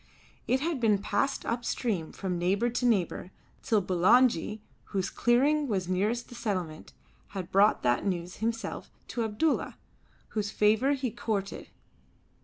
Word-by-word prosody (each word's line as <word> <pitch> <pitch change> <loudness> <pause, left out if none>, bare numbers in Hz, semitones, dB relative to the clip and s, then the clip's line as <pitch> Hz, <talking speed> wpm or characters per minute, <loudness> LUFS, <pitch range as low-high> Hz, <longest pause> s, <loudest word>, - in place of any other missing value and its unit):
It 260 +2 +2
had 320 -2 -1
been 220 -4 +3
passed 205 +7 -1
up 235 +1 -2
stream 200 -11 -2
from 180 -3 -3
neighbour 200 +7 +1
to 245 +1 0
neighbour 190 -5 0 0.3
till 215 -4 +1
Bulangi, 210 +3 +3 0.3
whose 190 -2 -2
clearing 285 +5 +2
was 190 -6 -1
nearest 210 +6 0
to - - -24
the 245 - -10
settlement, 185 -8 -3 0.5
had 180 -2 -5
brought 200 +2 +4
that 120 -1 +2
news 180 -2 -3
himself 230 +1 -3 0.2
to 235 - -2
Abdulla 225 +9 0 0.5
whose 210 -2 -2
favour 220 +7 +3
he 260 -4 -2
courted. 210 -4 -3
215 Hz, 145 wpm, -29 LUFS, 190-240 Hz, 0.5 s, brought